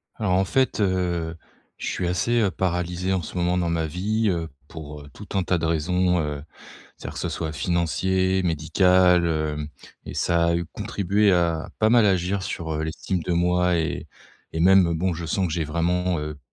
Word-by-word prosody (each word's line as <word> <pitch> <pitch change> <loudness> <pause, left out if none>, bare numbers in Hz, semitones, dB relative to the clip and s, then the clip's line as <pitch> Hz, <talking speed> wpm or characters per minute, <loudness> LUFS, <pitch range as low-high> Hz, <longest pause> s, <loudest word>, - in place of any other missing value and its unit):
Alors 105 -5 0
en 95 +1 +3
fait, 130 +3 +1
heu, 90 -4 0 0.4
je - - -5
suis 90 - -2
assez, 95 +7 +1
heu, 100 -3 +2
paralysé 90 0 -1
en 95 - 0
ce 85 - -9
moment 90 +1 +1
dans 85 -2 0
ma 80 -1 0
vie, 105 +7 0
heu, 85 -3 -2 0.2
pour, 75 -2 -9
heu, 70 - -12
tout 105 - -11
un 95 - +2
tas 90 +1 +1
de 80 - -2
raisons, 90 +3 +1
heu, 75 -2 -3 0.6
c'est-à-dire - - -8
que - - -5
ce - - -2
soit 80 -2 -3
financier, 95 +3 0
médical, 90 +2 +3
heu, 75 -2 -1 0.4
et - - -8
ça 85 -1 +2
a 85 - +2
eu 85 0 -1
contribué 100 +4 +1
à, 85 -2 +1
heu, - - -14
pas 110 - +3
mal 115 -1 +5
agir 95 0 +1
sur, 85 -3 -4
heu, 75 - -2
l'estime 85 +3 -3
de 90 - -2
moi 90 +1 +2
et 80 -1 -2 0.5
et 80 - -1
même, 90 -1 +5
bon, 90 +3 0
je 85 0 -5
sens 95 +3 0
que 80 - -4
j'ai 80 -1 -1
vraiment, 85 +3 0
heu, 75 -1 -5
90 Hz, 205 wpm, -24 LUFS, 80-95 Hz, 0.6 s, mal